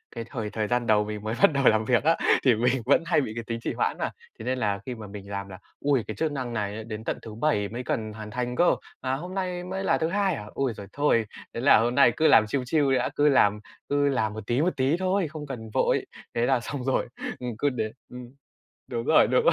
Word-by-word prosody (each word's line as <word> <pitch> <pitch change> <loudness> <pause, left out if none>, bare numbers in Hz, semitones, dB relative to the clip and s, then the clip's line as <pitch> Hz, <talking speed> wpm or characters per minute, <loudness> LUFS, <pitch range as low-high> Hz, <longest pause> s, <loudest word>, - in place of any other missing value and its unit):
cái 115 - -4
thời 110 -5 -4
thời 110 -1 -2
gian 120 0 0
đầu 105 -1 +4
mình 105 0 -6
mới 110 +2 -2
bắt - - +8
đầu 140 0 +1
làm 110 0 +4
việc 125 +2 +2
á 165 +1 +3 0.3
thì 125 -4 +5
mình 125 +3 +1
vẫn 140 +5 +4
hay 165 -3 +3
bị 110 - -4
cái 115 - -4
tính 115 0 -3
trì - - -2
hoãn - - -1
mà, - - -1 0.3
thế 110 - -7
nên 130 +1 0
là 100 -3 0
khi 125 - -4
mà 110 -2 -9
mình 100 0 -9
làm 100 0 -4
là 95 - -10 0.3
"Ôi, 135 -6 +3
cái 110 - -5
chức 160 -2 -1
năng 130 -4 -4
này 105 -3 -2
ấy 110 - -6
đến 110 0 -7
tận - - -2
thứ 110 -2 -9
Bảy 115 -6 0
mới 120 +3 -5
cần 110 -2 -2
hoàn 105 -1 -8
thành 125 +1 -3
cơ, 175 +4 +4 0.3
mà 130 0 -1
hôm 180 +7 -7
nay 180 -2 -2
mới 190 +2 -4
là 190 - +2
thứ 160 - 0
Hai 195 -2 +1
hả? 105 - -7
Ôi 135 -3 -1
giời 100 - -8
thôi, 140 -6 +2 0.3
thế - - -4
là 135 - +7
hôm 120 +2 0
nay 125 -4 +6
cứ 160 - +4
làm 110 - +6
chill 130 +3 -1
chill 140 0 +2
đi 130 - +4
đã, 125 - 0
cứ 150 +1 +4
làm 105 -6 +4 0.3
cứ 145 0 +2
làm 110 -6 0
một 110 -2 -8
tí, 120 +4 +1
một 175 - +3
tí 135 +6 +2
thôi, 185 -1 0
không 150 0 -7
cần 110 -5 -7
vội". - - +2 0.3
Thế 120 0 +2
là 130 0 +3
xong 130 +2 -5
rồi 135 -1 0 0.3
ừm, 125 - -4
cứ 145 - +2
đến, 110 -4 -3 0.2
ừm 125 0 -8 0.7
đúng 120 -2 -2
rồi, - - +5
đúng - - +2
rồi, - - +5
125 Hz, 275 wpm, -26 LUFS, 110-145 Hz, 0.7 s, bắt